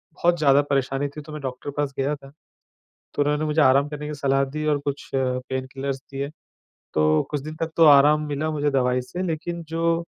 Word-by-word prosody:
बहुत 175 Hz, 0 st, +2 dB
ज़्यादा 140 Hz, -2 st, +5 dB
परेशानी 135 Hz, 0 st, 0 dB
थी 150 Hz, -, -6 dB
तो 155 Hz, +1 st, -12 dB
मैं 150 Hz, -, -6 dB
डॉक्टर 130 Hz, +1 st, -5 dB
के -, -, -6 dB
पास 145 Hz, -2 st, -1 dB
गया 140 Hz, +2 st, 0 dB
था, 135 Hz, -1 st, -15 dB, 0.8 s
तो -, -, +2 dB
उन्होंने 150 Hz, +1 st, +1 dB
मुझे 155 Hz, +1 st, +1 dB
आराम 140 Hz, +2 st, +4 dB
करने 150 Hz, 0 st, -6 dB
की 150 Hz, -, -4 dB
सलाह 135 Hz, -1 st, +1 dB
दी 155 Hz, +3 st, -5 dB
और 150 Hz, -1 st, +2 dB
कुछ 140 Hz, 0 st, -4 dB
पेनकिलर्स 130 Hz, +1 st, -2 dB
दिए। 140 Hz, 0 st, -3 dB, 0.7 s
तो 75 Hz, 0 st, +3 dB
कुछ 145 Hz, -2 st, -1 dB
दिन 155 Hz, +2 st, -7 dB
तक 165 Hz, -, -1 dB
तो 165 Hz, -, +6 dB
आराम 145 Hz, +1 st, +7 dB
मिला 150 Hz, +2 st, -2 dB
मुझे 150 Hz, -1 st, 0 dB
दवाई 125 Hz, -2 st, +2 dB
से, 175 Hz, +8 st, -5 dB
लेकिन 170 Hz, 0 st, -3 dB
जो 165 Hz, +1 st, 0 dB
145 Hz, 205 wpm, -24 LUFS, 135-155 Hz, 0.8 s, आराम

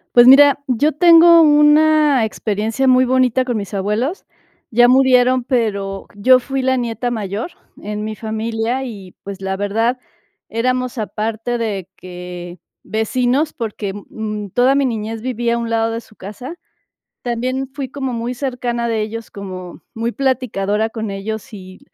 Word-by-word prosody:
Pues 240 Hz, +1 st, +8 dB
mira, 285 Hz, +1 st, +7 dB
yo 275 Hz, +5 st, +2 dB
tengo 335 Hz, +1 st, +7 dB
una 300 Hz, -3 st, +4 dB
experiencia 220 Hz, +4 st, -2 dB
muy 255 Hz, 0 st, +5 dB
bonita 255 Hz, 0 st, +2 dB
con 245 Hz, -2 st, -2 dB
mis 205 Hz, -1 st, -5 dB
abuelos, 215 Hz, -, -2 dB, 0.5 s
ya 240 Hz, +1 st, +5 dB
murieron, 255 Hz, 0 st, +4 dB
pero, 200 Hz, -6 st, -2 dB
yo 255 Hz, +6 st, +5 dB
fui 270 Hz, +1 st, -3 dB
la 260 Hz, 0 st, +1 dB
nieta 240 Hz, 0 st, -2 dB
mayor 215 Hz, -, -4 dB, 0.3 s
en 210 Hz, +1 st, -4 dB
mi 215 Hz, 0 st, -4 dB
familia, 225 Hz, +3 st, -3 dB
y 200 Hz, -7 st, -9 dB
pues, 200 Hz, -1 st, -7 dB
la 190 Hz, 0 st, -2 dB
verdad, 225 Hz, +5 st, 0 dB, 0.5 s
éramos 255 Hz, +2 st, -1 dB
aparte 225 Hz, +2 st, -3 dB
de 200 Hz, -5 st, -3 dB
que 180 Hz, -1 st, -9 dB, 0.2 s
vecinos 250 Hz, +7 st, 0 dB
porque, 210 Hz, -4 st, -5 dB, 0.2 s
mm, 210 Hz, -2 st, -5 dB
toda 255 Hz, +6 st, +3 dB
mi 280 Hz, -, +2 dB
niñez 225 Hz, -2 st, -4 dB
viví 240 Hz, -1 st, -2 dB
a 235 Hz, -, +1 dB
un 235 Hz, -, -3 dB
lado 225 Hz, 0 st, 0 dB
de 230 Hz, -, -4 dB
su 220 Hz, -, -21 dB
casa. 215 Hz, -, -8 dB, 0.7 s
También 255 Hz, +3 st, -2 dB
fui 275 Hz, -3 st, -5 dB
como 265 Hz, -2 st, -4 dB
muy 235 Hz, +2 st, -3 dB
cercana 245 Hz, -2 st, -3 dB
de 225 Hz, -2 st, -1 dB
ellos, 220 Hz, +1 st, -6 dB
como, 185 Hz, -3 st, -8 dB
muy 230 Hz, +1 st, -3 dB
platicadora 220 Hz, -6 st, 0 dB
con 220 Hz, -2 st, -5 dB
ellos, 220 Hz, +5 st, -6 dB
y, 185 Hz, -2 st, -11 dB
235 Hz, 155 wpm, -18 LUFS, 210-255 Hz, 0.7 s, Pues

